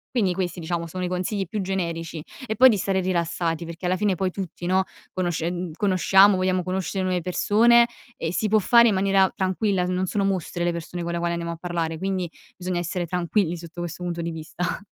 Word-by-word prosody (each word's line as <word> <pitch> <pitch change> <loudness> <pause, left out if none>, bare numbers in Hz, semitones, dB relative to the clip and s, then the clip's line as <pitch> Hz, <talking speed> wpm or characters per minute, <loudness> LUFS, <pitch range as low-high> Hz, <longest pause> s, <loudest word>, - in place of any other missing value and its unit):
Quindi 200 -7 +2
questi, 180 -1 -3
diciamo, 170 0 -3
sono 185 +3 -5
i - - 0
consigli 185 +3 -2
più 210 +3 -3
generici. 170 -4 -3 0.2
E 220 - -2
poi 260 +4 +8
di 220 - +2
stare 190 0 0
rilassati 170 -2 -1
perché 170 +2 -8
alla 185 +1 +1
fine, 200 -1 +1
poi 185 +1 -1
tutti, 180 -2 -6
no, 185 +2 +3 0.3
conoscen 175 -1 -2
conosciamo, 195 +1 +5
vogliamo 185 0 +1
conoscere 190 +1 -2
nuove 185 -1 0
persone, 230 +7 +4 0.3
e 160 - -3
si 215 - 0
può 215 +1 +4
fare 235 +3 +6
in 215 - +3
maniera 195 0 +3
tranquilla, 190 0 0
n 180 - -1
non 185 +1 0
sono 200 +2 -1
mostri 185 -2 -1
le 175 - +2
persone 170 +1 -5
con 170 - -3
le 170 - -2
quali 170 0 -1
andiamo 170 0 -3
a - - -9
parlare; 170 -2 -3
quindi 185 0 -2 0.3
bisogna 180 -1 -2
essere 175 +1 -2
tranquilli 175 +1 0
sotto 170 +1 -8
questo 175 +1 -5
punto 170 -1 -3
di 170 0 -3
vista. 160 +2 -4
180 Hz, 215 wpm, -24 LUFS, 170-195 Hz, 0.3 s, poi